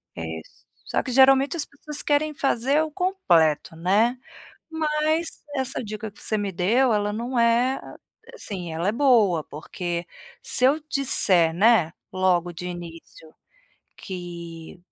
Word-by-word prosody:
É, - - -6 0.2
s 80 - -20 0.2
só - - -1
que 255 - -5
geralmente 270 +4 +5
as 300 - 0
pessoas 295 +1 -7
querem 300 +1 +1
fazer 275 +1 +1
o 315 - -2
completo, 175 - +1
né. 205 +9 +2 0.5
Mas 315 +1 0 0.3
essa 265 -1 -2
dica 215 -1 -6
que - - -19
você 215 - -1
me 205 -1 -2
deu 225 +8 +2
ela, 210 0 0
não 240 +3 -2
é 235 +3 +2 0.5
assim, 180 - -6
ela 170 +4 -1
é - - +1
boa 225 - +3
porque, 170 +3 -5 0.4
se 250 - +2
eu 275 +4 +4
disser, 185 - +3
né, 195 -4 +3 0.2
logo 180 -2 +1
de 180 +1 -7
início, 165 -2 -10 0.6
que, 170 -3 -8
215 Hz, 140 wpm, -24 LUFS, 175-270 Hz, 0.6 s, geralmente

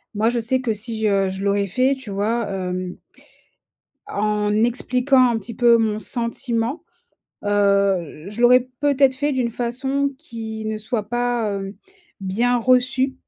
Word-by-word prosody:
Moi, 220 +2 +2
je 240 0 -1
sais 255 +3 0
que 235 -4 0
si 220 +1 -4
je 200 -3 +2
je 190 +1 -5
l'aurais 200 0 +1
fait, 255 +8 +2
tu 260 - -9
vois? 215 +3 -1
Hem 185 -1 -4 1.1
en 210 0 0
expliquant 250 +1 +3
un 235 - 0
petit 225 +2 -7
peu 235 0 +5
mon 215 -2 0
sentiment, 235 +3 -3 0.6
heu, 200 -6 +1
je 210 +3 -7
l'aurais 250 +1 +5
peut-être 280 -2 +3
fait 290 +3 -1
d'une 250 -3 0
façon 265 +4 -1
qui 225 -6 -7
ne 215 0 -2
soit 215 0 -3
pas, 240 -2 0
heu, 195 0 -5 0.4
bien 230 +6 +1
reçue. 255 +2 +2
230 Hz, 150 wpm, -21 LUFS, 205-250 Hz, 1.1 s, peu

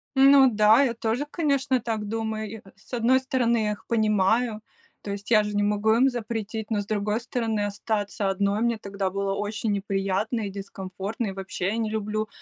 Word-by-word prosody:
Ну 270 0 +7
да, 215 +4 +5
я 250 -4 +1
тоже, 230 +4 -1
конечно, 280 -5 +1
так 225 -3 -3
думаю. 220 0 -3
И, - - -6
э, 195 - -15
с 205 +5 -19
одной 245 +2 +3
стороны, 255 -3 +1
я 210 - 0
их 210 - -7
понимаю, 215 +1 +2 0.4
то 200 - -5
есть 200 +3 -6
я 215 -2 +6
же 210 0 -4
не 205 - +2
могу 210 +1 +2
им 260 +4 +4
запретить, 220 -2 -4
но 210 -2 +1
с - - -7
другой 210 +2 -1
стороны, 230 -3 -2
остаться 205 -1 -2
одной 200 +2 0
мне 235 -1 +1
тогда 200 -2 -3
было 195 +1 -2
очень 210 +1 -2
неприятно 200 +3 -1
и - - -4
дискомфортно, 195 +2 -5
и - - -3
вообще, 190 -1 -4
я 210 +3 -1
не 225 -2 -1
люблю 215 0 -2
215 Hz, 200 wpm, -25 LUFS, 205-230 Hz, 0.4 s, Ну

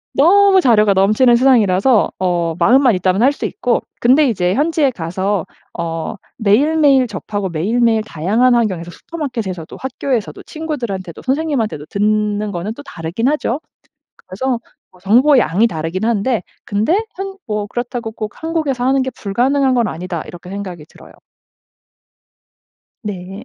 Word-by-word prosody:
너무 385 +5 +5
자료가 215 - +4
넘치는 215 +6 +4
세상이라서 235 -3 +3
어 175 -3 0
마음만 255 0 +5
있다면 185 +3 +1
할 270 - +5
수 - - -5
있고, 245 - 0 0.2
근데 265 +4 +4
이제 180 -5 0
현지에 300 -1 +2
가서 190 0 -2 0.3
어 165 -1 -3 0.2
매일매일 270 +5 +3
접하고 205 -3 -4
매일매일 220 +7 +1
다양한 215 +7 +1
환경에서 185 -7 -1
슈퍼마켓에서도 225 - -6
학교에서도 260 -3 -3
친구들한테도 235 - -5
선생님한테도 260 - -1
듣는 210 0 0
거는 200 +4 -4
또 285 - -10
다르긴 170 - -3
하죠. 295 -3 -1 0.6
그래서 245 +6 -3 0.3
어 180 - -21
정보량이 230 - +4
다르긴 165 0 -4
한데, 230 -1 0 0.2
근데 220 - +1 0.2
한 390 +1 -6
뭐 210 -1 -2
그렇다고 240 0 -4
꼭 215 -1 -6
'한국에서 310 -6 -1
하는 265 0 +2
게 260 - -4
불가능한 255 +6 +1
건 235 -3 +2
아니다.' 175 -2 -5
이렇게 175 +1 -11
생각이 190 -5 -6
들어요. - - -16 1.9
네. 195 0 -6
220 Hz, 340 characters per minute, -17 LUFS, 190-265 Hz, 1.9 s, 너무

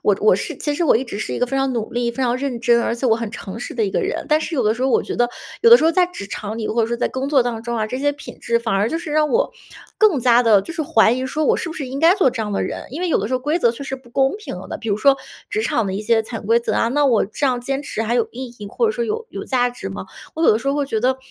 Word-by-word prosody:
我 205 - +3
我 210 -3 +5
是 - - -4
其 295 -1 -2
实 340 - 0
我 - - +4
一 230 - +2
直 225 -5 -6
是 - - -4
一 - - -3
个 250 - +1
非 270 +2 -2
常 270 -1 +1
努 230 -3 -3
力、 240 0 -1
非 260 +3 -4
常 245 0 +1
认 260 -3 -3
真、 235 0 +3
而 235 - 0
且 245 +2 -2
我 225 - +4
很 230 -2 -4
诚 220 -1 -7
实 - - -6
的 230 - -1
一 - - -2
个 - - 0
人。 405 +4 -3
但 305 - +4
是 330 - -4
有 260 - +1
的 215 +1 +2
时 245 - -5
候 265 - +2
我 - - +3
觉 - - -5
得 240 - +3 0.4
有 465 - +6
的 475 - +10
时 - - 0
候 325 - +5
在 360 +2 +3
职 350 - -8
场 215 +2 -5
里， 220 - -3
或 230 +1 +1
者 220 - +1
说 235 - -2
在 - - 0
工 270 +2 -3
作 270 -4 +5
当 235 -2 -3
中 235 0 -3
啊， 215 - 0
这 255 - -4
些 290 +1 +1
品 285 - -11
质 235 0 0
反 225 -3 -2
而 205 +4 +1
就 325 - -1
是 330 - -7
让 300 0 +2
我 - - +2 0.5
更 410 -11 +4
加 245 0 +5
地 220 -4 +5
就 330 - -8
是 320 - -1
怀 225 -6 +4
疑 255 +1 -2
说 300 +3 -1
我 - - +3
是 345 - -4
不 - - -5
是 295 -5 -5
应 265 +2 -5
该 330 +5 +5
做 380 -9 +3
这 235 -3 -3
样 210 -1 -4
的 - - 0
人？ - - -4
因 300 - -6
为 360 - -1
有 - - +3
的 - - -1
时 240 - -5
候 255 - +2
规 300 +6 0
则 235 - +3
确 240 - -8
实 270 0 -4
不 255 -2 -19
公 270 +8 +1
平 430 - -7
的， - - -4
比 225 -2 -5
如 200 - 0
说 275 +4 +5 0.3
职 420 +1 -1
场 230 - 0
的 190 - -3
一 205 - -3
些 225 0 +2
潜 220 -1 -7
规 230 +3 +3
则 235 - -2
啊， 230 - +2
那 290 +3 +2
我 235 -5 +3
这 220 +8 -2
样 250 -2 +1
坚 275 +2 -2
持 225 -6 -3
还 230 +2 -1
有 235 - +1
意 255 +2 -6
义， 205 - -7
或 470 - -1
者 440 - +1
说 475 0 -2
有 455 0 -3
有 - - -6
价 245 -2 +1
值 245 - -7
吗？ 95 0 -6 0.3
我 320 - -3
有 - - +6
的 215 - +1
时 275 - -3
候 280 - +1
会 290 -1 0
觉 225 - -1
得， 260 +2 +2
250 Hz, 385 characters per minute, -20 LUFS, 225-290 Hz, 0.5 s, 的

